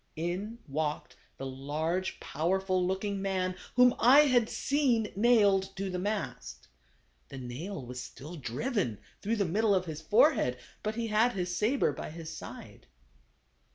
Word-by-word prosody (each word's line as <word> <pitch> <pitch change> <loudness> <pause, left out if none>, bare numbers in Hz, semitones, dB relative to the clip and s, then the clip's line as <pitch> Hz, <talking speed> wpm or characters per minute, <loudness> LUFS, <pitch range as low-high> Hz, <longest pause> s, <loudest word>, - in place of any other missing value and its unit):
In 180 +8 -3
walked 150 +1 -3 0.2
the 135 - -6
large, 155 +8 -2
powerful 185 +2 0
looking 195 +2 -1
man 185 -2 -1 0.2
whom 250 0 +6
I 265 +5 +8
had 250 -6 +3
seen 255 -7 +1
nailed 200 -4 +4
to 195 0 -3
the 180 - -2
mast. 65 - -4 0.6
The - - -8
nail 130 +6 -6
was 125 +1 -6
still 150 +6 -9
driven 145 - -2 0.2
through 220 +3 0
the 205 -3 +1
middle 205 +4 +2
of 185 -1 0
his 160 -2 -6
fore 215 - +5
head, 125 0 -1 0.2
but 215 +1 -2
he 235 0 -2
had 220 +3 +3
his 180 -2 -2
saber 230 +8 +2
by - - -6
his 165 0 -8
side. - - -10
190 Hz, 155 wpm, -30 LUFS, 155-215 Hz, 0.6 s, I